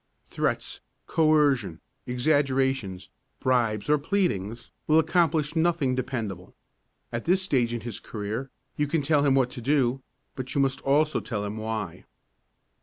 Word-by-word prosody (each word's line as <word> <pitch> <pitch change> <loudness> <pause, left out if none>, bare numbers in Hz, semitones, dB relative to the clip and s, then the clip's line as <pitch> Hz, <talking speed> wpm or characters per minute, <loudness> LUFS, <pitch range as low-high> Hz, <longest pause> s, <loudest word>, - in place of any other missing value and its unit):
Threats, - - -2 0.3
coercion, 150 - +2 0.3
exaggerations, 130 - 0 0.3
bribes 115 -5 +1
or 150 0 +3
pleadings 120 - -1 0.2
will 155 - +5
accomplish 160 -2 +2
nothing 160 -5 +2
dependable. 115 -8 -4 0.6
At 115 - -4
this 185 +2 +3
stage 130 -10 +1
in 120 -1 -3
his 120 -3 -6
career 110 +5 -5 0.3
you 150 - +1
can 150 0 0
tell 145 0 +3
him 140 -2 +4
what 130 -2 +2
to 125 - -7
do, 135 -1 +1 0.3
but 130 0 -5
you - - +2
must 135 0 0
also 150 +3 +2
tell 105 -4 -4
him 105 +1 -4
why. 110 -5 -4
130 Hz, 140 wpm, -26 LUFS, 115-150 Hz, 0.6 s, will